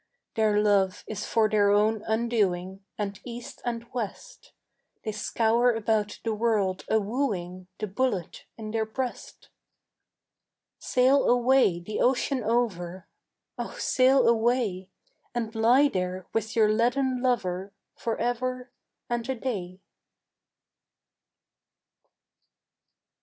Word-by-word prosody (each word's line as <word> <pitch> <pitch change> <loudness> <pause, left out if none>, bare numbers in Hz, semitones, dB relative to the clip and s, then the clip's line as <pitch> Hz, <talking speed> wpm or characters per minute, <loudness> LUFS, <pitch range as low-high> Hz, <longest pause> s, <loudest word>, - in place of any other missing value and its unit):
"Their 215 -2 +2
love 200 -3 +2
is 210 -1 -5
for 225 -1 +3
their 205 -1 +3
own 210 +1 +3
undoing. 200 -5 0
And 200 -1 -4
east 240 -1 -8
and 235 -1 -3
west 250 - -6 0.5
They 215 - -2
scour 230 +3 +2
about 215 -2 0
the 225 - -1
world 210 -4 0
a 220 - +4
wooing 195 -6 -3
The 215 - -3
bullet 205 -3 -2
in 215 -1 -6
their 220 -1 -1
breast. 250 +2 -6 1.3
"Sail 260 +2 +3
away 245 -7 +4
the 210 +5 -5
ocean 255 0 +1
over, 190 -6 -1 0.5
Oh - - -5
sail 260 0 +4
away, 225 -5 +1 0.5
And 225 -2 -2
lie 240 +6 +5
there 185 -5 -3
with 220 0 -2
your 215 -2 +4
leaden 250 +3 +1
lover 195 -7 -1 0.2
For 230 -1 -3
ever 250 +1 -2 0.4
and 240 0 -3
a 265 - 0
day." 195 -7 -4
220 Hz, 110 wpm, -27 LUFS, 200-245 Hz, 1.3 s, lie